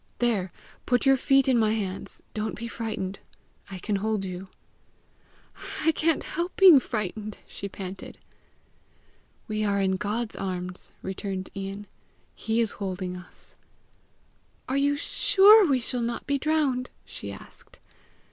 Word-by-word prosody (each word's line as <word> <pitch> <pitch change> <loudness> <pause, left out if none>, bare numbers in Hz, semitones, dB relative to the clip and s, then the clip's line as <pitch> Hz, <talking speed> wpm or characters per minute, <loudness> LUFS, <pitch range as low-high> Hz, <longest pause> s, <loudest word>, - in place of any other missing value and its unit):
There 210 -7 0 0.4
put 245 +1 +2
your 270 0 +6
feet 270 0 +3
in 255 -3 +4
my 215 -1 +3
hands. 195 -4 -3
Don't 215 0 -2
be 235 +2 -5
frightened; 215 -4 -4 0.5
I 190 - -6
can 200 +3 -1
hold 210 -1 -1
you." 185 +1 -6 1.4
"I 320 - +6
can't 320 0 +1
help 345 +3 -3
being 365 -7 +9
frightened!" 215 -3 -4
she 200 - -7
panted. 190 0 -8 1.3
"We 215 -1 -1
are 200 -1 +1
in 190 -1 +1
God's 215 +3 -2
arms," 180 -1 -3
returned 190 0 -4
Ian. 195 +1 -5 0.5
"He 225 +1 0
is 225 - +1
holding 185 -1 -3
us." 180 -1 -13 1.1
"Are 260 - -1
you 285 +1 +3
sure 400 +7 +6
we 270 -3 +3
shall 245 +1 -2
not 235 0 -3
be 280 0 0
drowned?" 285 -4 +1 0.2
she - - -7
asked. - - -13
215 Hz, 140 wpm, -27 LUFS, 195-265 Hz, 1.4 s, being